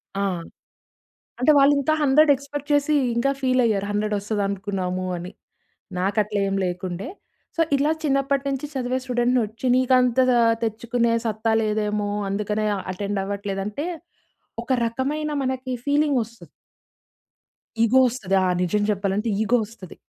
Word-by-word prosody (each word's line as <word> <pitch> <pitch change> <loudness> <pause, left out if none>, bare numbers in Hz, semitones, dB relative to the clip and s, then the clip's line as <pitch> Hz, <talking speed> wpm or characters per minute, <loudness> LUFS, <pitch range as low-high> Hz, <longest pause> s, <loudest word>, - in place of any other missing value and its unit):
ఆ! 200 - 0 1.2
అంటే 300 +4 +5
వాళ్ళు 280 +1 +6
ఇంకా 310 +3 +1
100 290 +2 +5
ఎక్స్‌పెక్ట్ 285 +1 -7
చేసి 290 +1 +2 0.2
ఇంకా 275 +4 +2
ఫీల్ 255 -1 +2
అయ్యారు 200 -2 0
100 210 0 -1
వస్తది 205 0 -2
అనుకున్నాము 185 -2 -3
అని. 175 +2 -7 0.7
నాకు 195 +3 0
అట్లా 210 0 -3
ఏమి 195 0 -1
లేకుండే, 180 +1 -4 0.5
సో - - -1 0.2
ఇలా 295 +3 +2
చిన్నప్పటి 275 -1 +1
నుంచి 275 +1 -2
చదివే 255 0 -1
స్టూడెంట్‌ని, 245 0 +1
వచ్చి 220 +4 -7
నీకు 255 0 +3
అంత 250 0 +1 0.5
తెచ్చుకునే 230 +1 0
సత్తా 220 +1 0
లేదేమో 210 -1 -1 0.2
అందుకనే 210 +1 -1
ఆ! - - -4
అటెండ్ 200 +1 -3
అవ్వట్లేదు 200 -1 -3
అంటే 280 +10 -4 0.8
ఒక 260 - -2
రకమైన 285 +6 -2
మనకి 260 0 -3
ఫీలింగ్ 290 -2 +2
వస్తది. 230 +1 -15 1.4
ఈగో 250 +4 +4
వస్తది. 210 -6 -2
ఆహ్, 180 - +2
నిజం 205 +4 +1
చెప్పాలంటే 200 +2 -1
ఈగో 230 +3 +3
వస్తది. 200 -5 -12
225 Hz, 140 wpm, -23 LUFS, 200-265 Hz, 1.4 s, వాళ్ళు